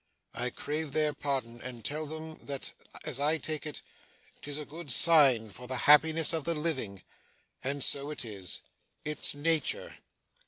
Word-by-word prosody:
I 125 +1 -1
crave 150 +3 -3
their 155 -1 +3
pardon 130 -5 -2
and 120 -3 -7
tell 155 +1 -2
them 160 +1 -6
that, 140 -2 -4 0.3
as 130 - -2
I 150 +3 +3
take 155 +1 -2
it, 150 - -6 0.6
'tis 145 0 -5
a 150 - -5
good 160 +1 -9
sign 135 -11 +5
for 120 +6 -10
the 130 - -3
happiness 160 +2 +7
of 160 -2 +1
the 170 +2 0
living. 130 - -1 0.6
And 140 +1 -1
so 140 +1 +1
it 150 -4 -4
is. 100 -5 -5 0.4
It's 150 -1 -1
nature. 155 0 +1
145 Hz, 160 wpm, -31 LUFS, 125-155 Hz, 0.6 s, happiness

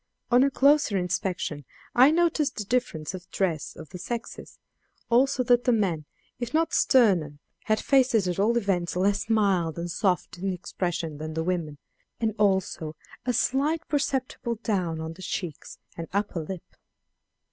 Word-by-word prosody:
On 245 +1 +6
a 280 - +4
closer 280 -6 +3
inspection 180 -4 -2 0.3
I 255 +3 +7
noticed 320 -4 +2
the 210 - -2
difference 195 -9 -1
of 180 -1 -9
dress 170 -6 -1
of 160 -3 -10
the 180 - -8
sexes; 235 +5 -6 0.5
also 255 +2 +3
that 245 0 +3
the 250 - +4
men, 185 -9 0 0.3
if 240 +2 -3
not 325 +1 +2
sterner, 180 - +3 0.3
had 215 0 +2
faces 250 -8 +3
at 180 +1 -2
all 225 +4 +3
events 180 -7 0
less 200 +4 +1
mild 195 -7 +2
and 170 0 -3
soft 180 +1 0
in 195 +1 -1
expression 175 -3 -3
than 155 0 -5
the 160 - -1
women, 165 -4 -2 0.4
and 225 -2 0
also 190 -6 +1 0.3
a 250 - +2
slight 285 +7 +1
perceptible 265 -4 -1
down 180 -7 -1
on 160 0 -5
the 185 - -14
cheeks 175 -4 -5 0.2
and 165 -1 -6
upper 200 -3 -1
lip. 180 +2 -6
195 Hz, 160 wpm, -26 LUFS, 170-245 Hz, 0.5 s, I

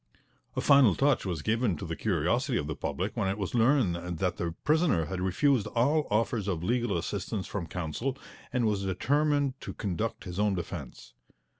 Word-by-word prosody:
A - - 0
final 140 -9 +6
touch 135 -7 +2
was 85 -5 -3
given 110 -5 +1
to 95 - -6
the 80 -1 -4
curiosity 110 - 0
of 75 - -1
the 75 0 -4
public - - -3
when - - 0
it 95 +2 -1
was 100 -3 -3
learned 100 - +2
that 90 0 -1
the 85 -1 -3
prisoner 155 - +3
had 90 +3 -4
refused 110 +6 +2
all 145 +6 +2
offers 105 -1 0
of 85 -4 -2
legal 120 -1 +1
assistance 95 +3 -3
from 95 -5 -4
counsel 90 - -3 0.3
and 125 -3 +1
was 105 -2 +1
determined 145 +7 +1
to - - -7
conduct 105 +3 -3
his 90 0 -6
own 105 -1 +2
defence. 70 -7 -7
105 Hz, 180 wpm, -29 LUFS, 90-125 Hz, 0.3 s, final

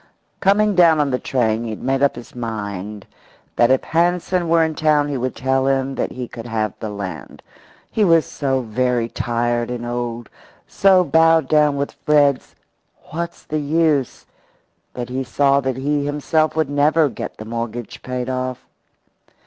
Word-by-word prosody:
Coming 210 +2 +3
down 170 -4 +5
on 145 -2 +1
the 125 - 0
train 115 -3 0
he 115 - -4
had 110 - -7
made 135 +1 0
up 140 - +3
his 120 0 -11
mind 105 -4 -5 0.5
that 120 - +4
if 130 0 +3
Hansen 175 +1 0
were 165 0 +4
in 160 0 -1
town 150 -1 +2
he 145 - -2
would 130 -1 -2
tell 130 +1 0
him 135 0 0
that - - -2
he 125 -1 -5
could 115 0 -9
have 110 -2 -1
the 110 - -4
land. 100 -2 -7 0.5
He 220 - -1
felt 165 -5 +5
so 135 -2 -2
very 120 +1 0
tired 120 0 -1
and 120 -1 -4
old, 120 -1 -4 0.4
so 190 -2 +4
bowed 160 -1 +4
down 150 -1 +3
with 140 0 -2
Fred's 145 -3 +1 0.6
"What's 170 +2 -5
the 155 - -3
use?" 150 -2 0 0.7
that 120 -1 -5
he 130 +1 -2
saw 140 +2 +2
that 130 -2 -2
he 145 +2 0
himself 150 +2 0
would 160 -2 +1
never 150 +2 +3
get 120 - -7
the 110 - -8
mortgage 115 0 -5
paid 125 -1 -4
off. 130 -1 -3
135 Hz, 170 wpm, -20 LUFS, 120-155 Hz, 0.7 s, down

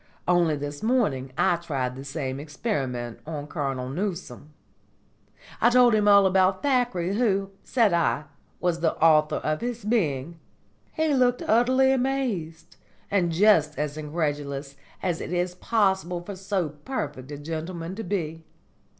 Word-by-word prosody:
Only 175 -3 +3
this 145 0 -6
morning 205 - 0
I 175 - +3
tried 135 -7 -3
the 135 - -8
same 135 -2 -4
experiment 135 - -3
on 150 -3 -4
Colonel 135 -4 -3
Newcome. 165 - -5 1.1
I 235 - +6
told 245 -1 +5
him 210 -1 +3
all 200 -1 +7
about 190 0 +3
Thackeray, 245 -10 +1
who, 200 -5 +1
said 225 -7 +2
I, 170 -3 +1 0.4
was 175 -2 0
the 165 -1 +1
author 155 -1 +4
of 155 0 -2
his 240 -3 -4
being. 165 - -1 0.5
He 315 -2 +1
was 250 -2 +3
utterly 255 +4 +4
amazed, 245 -12 -2 0.3
and 180 -4 +2
just 165 -4 +4
as 150 0 -2
incredulous 145 -3 -3 0.3
as 175 -3 -1
it - - -5
is 180 0 0
possible 190 -3 0
for 200 +2 -7
so 190 -3 -2
perfect 145 - -5
a 145 - -6
gentleman 165 +3 -5
to 225 +3 -5
be. 165 -4 -3
170 Hz, 140 wpm, -25 LUFS, 150-210 Hz, 1.1 s, all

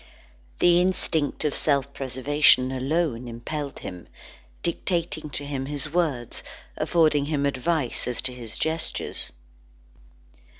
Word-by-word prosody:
The 175 0 +5
instinct 165 -5 +1
of 150 - +1
self 140 -2 +2
preservation 130 0 +3
alone 130 -2 0
impelled 140 +5 -5
him, 90 -1 -8 0.6
dictating 170 -2 -1
to 145 0 -3
him 135 -2 -3
his 145 +1 -2
words, 145 -10 0 0.3
affording 155 -4 +3
him 145 -1 0
advice 140 0 0
as 125 - -2
to 130 -1 -2
his 120 -3 -6
gestures. 160 0 -2
145 Hz, 115 wpm, -26 LUFS, 130-160 Hz, 0.6 s, The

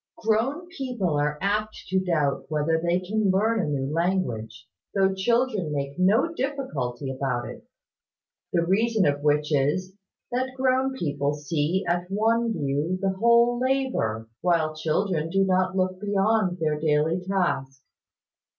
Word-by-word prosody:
Grown 230 +10 0
people 245 - -2
are 150 0 0
apt 210 +2 -1
to 190 +1 +2
doubt 150 -6 0
whether 160 +1 0
they 175 +1 +1
can 205 +2 0
learn 215 +4 +2
a - - -1
new 140 -1 -2
language, 125 -10 -2 0.3
though 195 -1 +3
children 215 -3 0
make 140 +2 -3
no 220 - +3
difficulty 150 - -3
about 130 -2 -2
it: - - -11 0.8
the 170 -1 +1
reason 220 +3 +2
of 145 0 +1
which 150 +1 +1
is, 150 +7 +1 0.4
that 260 +1 -2
grown 260 0 +2
people 145 - -1
see 150 +5 -1
at 175 +1 -1
one 225 +3 +1
view 145 +1 -1
the 195 0 +1
whole 235 +4 +3
labour, 255 - 0
while 165 -3 +1
children 160 +1 -1
do 195 +2 +2
not 185 0 +1
look 185 0 0
beyond 200 -2 +1
their 155 -3 -1
daily 155 +3 +1
task. 175 -8 -1
185 Hz, 140 wpm, -25 LUFS, 150-220 Hz, 0.8 s, though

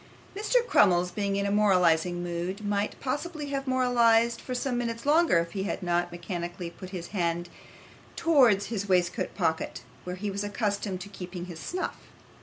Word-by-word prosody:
Mr. 470 +4 +2
Crummles 180 - +4
being 200 +1 -1
in 200 0 0
a 200 - 0
moralising 180 -4 +3
mood, 175 +4 -4
might 205 0 -1
possibly 295 +2 -3
have 275 -1 -3
moralised 235 -2 +3
for 255 - -5
some 250 0 -1
minutes 230 0 -3
longer 315 - +4
if 170 0 0
he 190 - -3
had 195 0 -3
not 175 0 0
mechanically 175 0 -5
put 185 +1 -10
his 180 -3 -6
hand 175 -2 -1 0.7
towards 250 -12 +4
his 200 -3 -4
waistcoat 180 -2 +1
pocket, 160 -4 -1 0.2
where 180 0 -5
he 200 +2 -3
was 200 +1 -3
accustomed 205 -2 -2
to 200 - -8
keep 185 -2 -9
his 175 -2 -6
snuff. 365 - -3
200 Hz, 170 wpm, -28 LUFS, 175-235 Hz, 0.7 s, Crummles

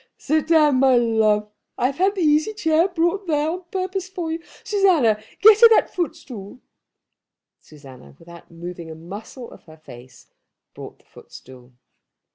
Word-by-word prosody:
"Sit 310 +1 -1
down, 305 -4 +3
my 265 -1 +4
love. 220 -3 +1 0.3
I - - -1
have 275 +4 -2
had 390 +2 +1
the 380 - -3
easy 310 +6 +1
chair 325 -2 +1
brought 355 +2 -2
there 305 0 0
on 360 +1 -7
purpose 375 0 -4
for 350 -4 -5
you. 325 +1 -4 0.2
Susanna, 335 - +2 0.2
get 430 +1 +7
her 465 - +9
that 445 - +2
footstool." 265 - -6 1.0
Susanna, 140 -4 -16
without 170 +1 -15
moving 170 0 -9
a 160 - -9
muscle 205 +9 -10
of - - -15
her 160 -1 -16
face, 125 -5 -15 0.5
brought - - -11
the - - -31
footstool. 125 -1 -16
280 Hz, 155 wpm, -21 LUFS, -, 1.0 s, her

